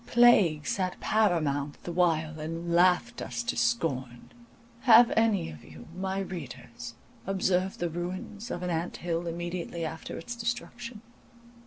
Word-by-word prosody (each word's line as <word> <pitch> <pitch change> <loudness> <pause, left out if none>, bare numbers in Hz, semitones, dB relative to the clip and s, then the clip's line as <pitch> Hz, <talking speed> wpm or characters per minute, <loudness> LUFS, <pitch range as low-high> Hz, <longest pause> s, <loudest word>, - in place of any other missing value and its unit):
Plague 205 -11 +5
sat 185 -2 -1
paramount 155 -9 +1
the 175 - -4
while, 160 -3 +1
and 165 +2 -4
laughed 175 -8 +3
us 120 +1 -3
to - - -2
scorn. 120 +1 -1 0.5
Have 235 -1 +7
any 220 - +2
of 75 - -12
you, 80 0 -12
my 190 +1 -2
readers, 125 -10 -7 0.3
observed 190 -1 +1
the 175 - -1
ruins 185 +6 -5
of 180 - -4
an 180 - -1
anthill 170 0 -2
immediately 170 0 -4
after 160 0 -6
its 240 +8 -6
destruction? 235 0 -4
175 Hz, 135 wpm, -29 LUFS, 155-195 Hz, 0.5 s, Have